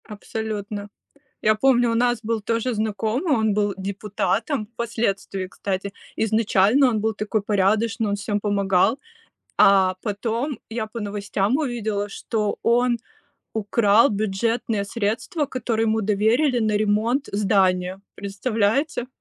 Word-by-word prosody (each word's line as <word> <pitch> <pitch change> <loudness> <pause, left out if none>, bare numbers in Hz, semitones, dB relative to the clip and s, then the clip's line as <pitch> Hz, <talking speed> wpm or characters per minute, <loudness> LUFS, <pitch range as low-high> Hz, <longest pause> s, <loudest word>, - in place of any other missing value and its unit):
Абсолютно. 210 -1 -5 0.5
Я 215 0 +4
помню, 245 0 +3
у - - 0
нас 240 -1 +1
был 225 0 -1
тоже 230 +3 -1
знакомый, 220 - -1
он 220 -2 +1
был 205 -1 +1
депутатом 205 +5 -2
впоследствии, 220 -5 -2
кстати. 195 +1 -4 0.2
Изначально 220 +3 +3
он 220 -3 -1
был 220 +1 0
такой 215 +1 -1
порядочный, 210 +3 +1
он 200 - 0
всем 205 +1 -2
помогал, 200 +2 +2 0.6
а 190 -1 +5
потом 230 +6 -2
я 225 -1 -3
по 230 +2 -7
новостям 205 +2 -1
увидела, 220 -8 -2
что 210 +1 -2
он 240 +1 +3 0.6
украл 220 +2 +3
бюджетные 215 +1 -1
средства, 230 - -2
которые 230 -4 -1
ему 220 0 +1
доверили 220 +7 +2
на 220 -2 +1
ремонт 215 +6 +1
здания. 190 -2 +1 0.2
Представляете? 220 +6 -1
215 Hz, 120 wpm, -23 LUFS, 200-230 Hz, 0.6 s, а